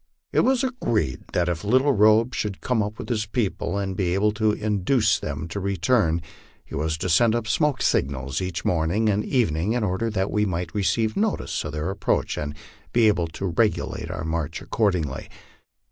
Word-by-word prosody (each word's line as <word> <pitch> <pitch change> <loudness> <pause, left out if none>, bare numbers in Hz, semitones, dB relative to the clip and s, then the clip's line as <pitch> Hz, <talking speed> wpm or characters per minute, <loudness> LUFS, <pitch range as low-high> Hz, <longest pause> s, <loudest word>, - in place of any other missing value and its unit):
It - - +3
was 265 0 +3
agreed 120 - -1
that 90 -1 +1
if 85 0 -2
Little 130 +7 +3
Robe 110 +3 +4
should 105 -5 -3
come 125 -3 0
up 105 +1 -3
with - - -7
his 110 -3 -1
people 105 -3 -1
and 95 -2 -2
be 90 -2 0
able 105 +2 +2
to 105 0 +1
induce 105 +2 +1
them 75 +2 -4
to 90 - -4
return, 95 -3 +1 0.4
he - - -14
was 80 +1 -1
to 85 - -3
send 115 +6 +4
up 120 -2 -1
smoke 145 +3 +1
signals 70 +1 0
each 90 -2 -4
morning 90 +6 +1
and 105 +1 +1
evening, 100 - +1
in 120 -2 0
order 105 +4 0
that 95 -2 -1
we 105 - +1
might 90 -3 -2
receive 110 +2 +1
notice 215 0 -1
of 75 - -5
their 75 +5 -2
approach 100 - 0
and 75 0 -4 0.4
be 120 -2 +4
able 90 -5 +2
to 80 +4 -6
regulate 105 -6 0
our 85 -2 -4
march 80 -1 -2
accordingly. 90 - -1
100 Hz, 190 wpm, -24 LUFS, 85-110 Hz, 0.4 s, Robe